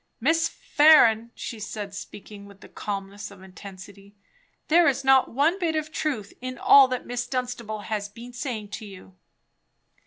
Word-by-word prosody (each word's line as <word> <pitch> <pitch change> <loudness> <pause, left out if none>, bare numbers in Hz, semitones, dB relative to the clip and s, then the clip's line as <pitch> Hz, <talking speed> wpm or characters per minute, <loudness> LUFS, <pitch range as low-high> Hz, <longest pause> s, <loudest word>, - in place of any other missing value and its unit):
"Miss 320 +5 +2
Farren," 235 -7 +4
she 230 - -7
said, 205 -1 -6
speaking 200 0 -10
with 200 -1 -17
the - - -13
calmness 200 0 -6
of 195 -2 -15
intensity, 195 +1 -13 0.5
"there 340 +2 +5
is 275 -1 +1
not 265 -1 +4
one 310 +9 +1
bit 330 -3 -1
of 310 0 -3
truth 260 -11 -3
in 255 0 -6
all 275 -1 +7
that 255 -1 -4
Miss 245 0 -4
Dunstable 245 -4 -4
has 205 -1 -4
been 235 +4 -12
saying 240 -5 -5
to 215 - -7
you." 185 - -14
230 Hz, 160 wpm, -25 LUFS, 200-270 Hz, 0.5 s, all